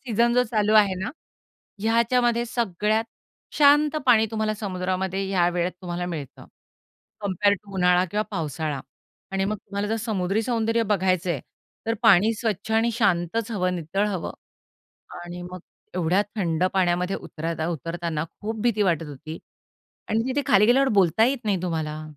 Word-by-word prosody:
Season 235 -1 +1
जो 250 - +5
चालू 215 -2 +2
आहे 205 -3 +5
ना, 190 +5 -4 0.7
ह्याच्यामध्ये 235 +1 +2
सगळ्यात 220 -1 0 0.5
शांत 295 +1 +5
पाणी 220 -3 +5
तुम्हाला 215 -1 -1
समुद्रामध्ये 190 -1 -2
या 175 -3 +2
वेळेत 175 +1 0
तुम्हाला 175 0 -3
मिळतं, 155 -6 -7 0.8
कंपेअर 200 0 +2
टू 200 0 -13
उन्हाळा 180 0 +3
किंवा 210 +1 0
पावसाळा. 155 -5 -3 0.5
आणि 195 0 0
मग 210 +2 -1
तुम्हाला 200 +1 -4
जर 225 - 0
समुद्री 200 -1 0
सौंदर्य 230 -1 +1
बघायचं 185 -4 +1
आहे, 145 -7 -1 0.5
तर 225 - +1
पाणी 215 -1 +6
स्वच्छ 220 -1 -3
आणि 225 +1 +3
शांतच 205 +1 0
हवं, 185 -4 0
नितळ 180 +5 -1
हवं. 190 -5 -3 0.9
आणि 175 0 -7
मग 180 0 -8 0.3
एवढ्या 180 +3 +2
थंड 170 -3 0
पाण्यामध्ये 180 0 +1
उतरता 160 0 -4
उतरताना 165 0 -3 0.2
खूप 220 +1 -4
भीती 230 -3 +2
वाटत 165 -5 +1
होती 155 +3 -8 0.7
आणि 225 +1 +1
तिथे 285 +2 0
खाली 210 +1 +5
गेल्यावर 265 +3 +4
बोलता 185 +4 +4
येत 260 -1 0
नाही 195 -4 0
तुम्हाला. 155 -3 -3
195 Hz, 150 wpm, -24 LUFS, 175-225 Hz, 0.9 s, पाणी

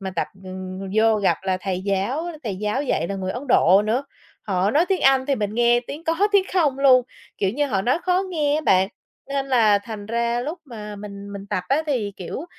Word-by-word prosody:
Mà 190 -1 -4
tập, - - 0 0.2
ừm, 185 0 -7
vô 220 0 +4
gặp 200 -2 +2
là 190 -1 0
thầy 185 -1 -2
giáo 200 - -1 0.2
thầy 205 -5 -3
giáo 210 +7 -1
dạy 170 - -1
là 200 - -3
người 190 -1 -3
Ấn 245 - -5
Độ 195 -3 +5
nữa, 235 +6 0 0.4
họ 190 0 0
nói 310 +8 +3
tiếng 385 -2 +1
Anh 270 -1 +4
thì 280 - +2
mình 210 -4 -3
nghe 240 +1 +4
tiếng 305 +4 -7
có 325 0 0 0.2
tiếng 400 -2 +5
không 300 -8 +2
luôn. 260 -2 +6 0.4
Kiểu 195 - +1
như, 290 +7 0
họ 200 -8 -1
nói 250 +9 +2
khó 365 +1 +2
nghe 300 -4 +1
á 305 - +1
bạn, 190 -9 +3 0.4
nên 275 -1 -2
là 225 -6 +4
thành 205 -1 -8
ra 235 +1 0
lúc 305 +8 -4
mà 210 -6 -8
mình 200 0 -9
mình 200 0 -8
tập 200 -3 -2
á, 280 +4 +2
thì, 235 -9 -1
kiểu, 190 - -6
225 Hz, 230 wpm, -22 LUFS, 200-275 Hz, 0.4 s, luôn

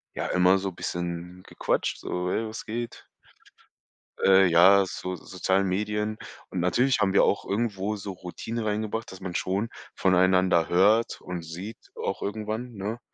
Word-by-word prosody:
Ja, - - -2
immer 90 +1 +4
so 95 0 -3
bisschen 85 +1 -5
gequatscht, - - -1
so: 90 0 -3
„Hey, 110 +3 -1
was 110 +1 -7
geht?“ 115 +1 -5 1.2
Ja, 95 0 +6
so 90 0 -5
sozialen 95 +3 0
Medien. 105 +2 -1 0.3
Und 95 - -3
natürlich 120 +9 +2
haben 95 -2 +2
wir 100 - +5
auch 100 - +1
irgendwo 105 -1 -1
so 100 -1 -6
Routine 110 +5 -5
reingebracht, 110 +1 -2
dass 95 0 -11
man 90 -2 -5
schon 95 +5 -1 0.3
voneinander 95 -2 +3
hört 105 +6 +3
und 90 -2 -5
sieht 90 +7 -7 0.2
auch - - -3
irgendwann, 110 +4 -4
ne? 105 +3 -4
95 Hz, 145 wpm, -26 LUFS, 90-110 Hz, 1.2 s, Ja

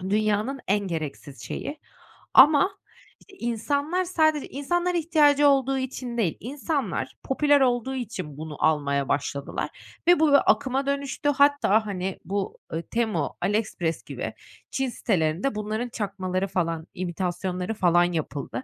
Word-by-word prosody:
dünyanın 215 +6 0
en 205 +1 +4
gereksiz 155 -4 -5
şeyi 300 +1 -5 0.6
ama, 300 +8 +7 0.5
işte, 405 - -20
insanlar 285 +9 -1
sadece 315 -4 +2
insanlar 350 +6 -1
ihtiyacı 295 -3 +4
olduğu 270 -1 +3
için 255 -2 -4
değil, 185 -8 0
insanlar 245 - -3
popüler 285 +1 +3
olduğu 250 +1 +1
için 185 - -5
bunu 155 -2 -7
almaya 140 -3 +1
başladılar 140 0 -4
ve 350 -2 +6
bu 315 - +5
bir 280 - +6
akıma 270 0 -1
dönüştü. 280 +1 -1
Hatta, 280 -7 +4
hani, 190 -2 -3
bu, 200 0 -3 0.2
eee, 165 - -1
Temu, 215 -10 -1
AliExpress 195 -4 -1
gibi - - -5 0.4
Çin 265 -1 -1
sitelerinde 185 +2 0
bunların 215 +3 -3
çakmaları 195 -3 -2
falan, 165 -3 -2
imitasyonları 180 +2 -3
falan 175 -3 +4
yapıldı. 140 -5 -4
220 Hz, 130 wpm, -25 LUFS, 180-280 Hz, 0.6 s, ama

